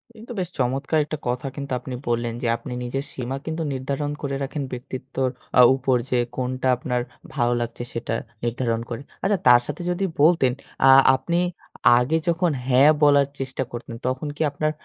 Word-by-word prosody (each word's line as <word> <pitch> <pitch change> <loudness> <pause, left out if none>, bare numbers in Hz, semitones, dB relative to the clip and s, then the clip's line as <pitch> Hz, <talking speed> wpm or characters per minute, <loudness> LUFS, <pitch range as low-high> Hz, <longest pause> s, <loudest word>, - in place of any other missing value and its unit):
কিন্তু 225 +2 -11
বেশ 180 -2 -2
চমৎকার 135 +5 0
একটা 155 - -4
কথা 125 +3 -1
কিন্তু 140 -1 -6
আপনি 125 +1 -6
বললেন 120 0 0
যে 120 - -1
আপনি 125 - -7
নিজের 135 +3 -3
সীমা 130 +1 -4
কিন্তু 160 +1 -3
নির্ধারণ 140 +2 -2
করে 140 -2 -2
রাখেন 140 +1 -3
ব্যক্তিত্বর 130 +1 -3 0.3
আ - - +11
উপর। 130 -1 +1
যে 125 - +2 0.2
কোনটা 130 0 -2
আপনার 125 0 -1 0.3
ভালো 120 -3 +2
লাগছে 120 +1 -4
সেটা 115 -1 -2 0.3
নির্ধারণ 120 -1 -1
করে। 120 +1 -4 0.2
আচ্ছা, 200 +1 +2
তার 120 -1 +8
সাথে - - -5
যদি 185 +2 -1 0.2
বলতেন 155 -5 +5 0.4
আ - - +8 0.3
আপনি 170 +7 -1 0.6
আগে 135 +7 +1
যখন 170 0 +2 0.2
হ্যাঁ 135 +3 +6
বলার 145 -1 +5
চেষ্টা 130 0 -2
করতেন 120 -1 -7
তখন 130 +4 -2
কি - - -7
আপনার 155 +2 -1
130 Hz, 175 wpm, -23 LUFS, 125-145 Hz, 0.6 s, আ